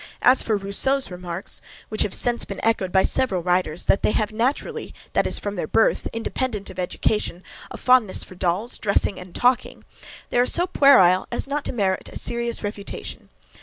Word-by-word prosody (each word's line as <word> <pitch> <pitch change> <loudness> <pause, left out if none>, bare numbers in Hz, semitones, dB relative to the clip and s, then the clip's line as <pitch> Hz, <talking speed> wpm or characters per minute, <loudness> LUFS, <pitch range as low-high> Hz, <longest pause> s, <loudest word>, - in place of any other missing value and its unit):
As 255 +1 +6
for 220 -2 0
Rousseau's 200 +6 +2
remarks, 180 +1 -3 0.3
which 215 - -2
have 205 - +1
since 240 -1 0
been 200 - -7
echoed 210 -5 +1
by 190 0 +4
several 190 -9 0
writers, 180 -2 0
that - - +3
they - - +1
have 215 -1 -1
naturally, 240 +6 -2 0.2
that - - +2
is - - +2
from 205 0 -5
their 155 - -3
birth, 225 - +2
independent 225 -2 -4
of - - -10
education, 180 0 -2 0.3
a - - -8
fondness 250 -6 +3
for - - -12
dolls, 185 +5 -2
dressing, 200 -2 0
and 180 -1 -12
talking, 250 0 0 0.5
they - - +1
are 245 - +4
so 350 - +3
puerile 225 - +5
as 240 - -1
not 290 +1 -2
to - - -1
merit 195 -5 -1
a - - -5
serious 235 -1 -1
refutation. 205 -1 -7
210 Hz, 185 wpm, -22 LUFS, 185-245 Hz, 0.5 s, As